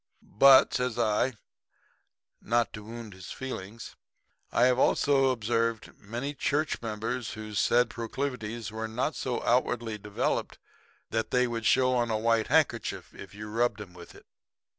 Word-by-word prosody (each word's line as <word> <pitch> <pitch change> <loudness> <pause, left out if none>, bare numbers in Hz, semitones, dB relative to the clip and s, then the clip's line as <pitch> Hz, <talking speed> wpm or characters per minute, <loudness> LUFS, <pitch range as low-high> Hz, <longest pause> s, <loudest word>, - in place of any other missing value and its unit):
But,' 135 -1 +8
says 125 -2 -1
I, 115 +3 +1 1.1
not 115 -2 0
to 105 - -8
wound 115 -1 -9
his 95 0 -11
feelings, 115 -4 -7 0.6
'I - - +3
have 125 0 +3
also 135 -1 +3
observed 115 -2 -1
many 120 +8 -5
church 150 +2 -1
members 110 +1 -3
whose 110 -2 -4
said 120 0 +3
proclivities 115 -2 -4
were 110 0 -4
not 125 +7 -2
so 125 -2 -3
outwardly 120 -2 0
developed 105 0 -2 0.5
that 115 0 -1
they 125 0 +3
would 115 -2 -2
show 130 0 +4
on 120 -2 +1
a 110 - +1
white 115 0 +1
handkerchief - - 0
if 100 +1 -11
you 105 +1 -7
rubbed 115 +2 0
'em 100 -4 -9
with 85 -1 -13
it.' - - -16
115 Hz, 150 wpm, -28 LUFS, 110-125 Hz, 1.1 s, But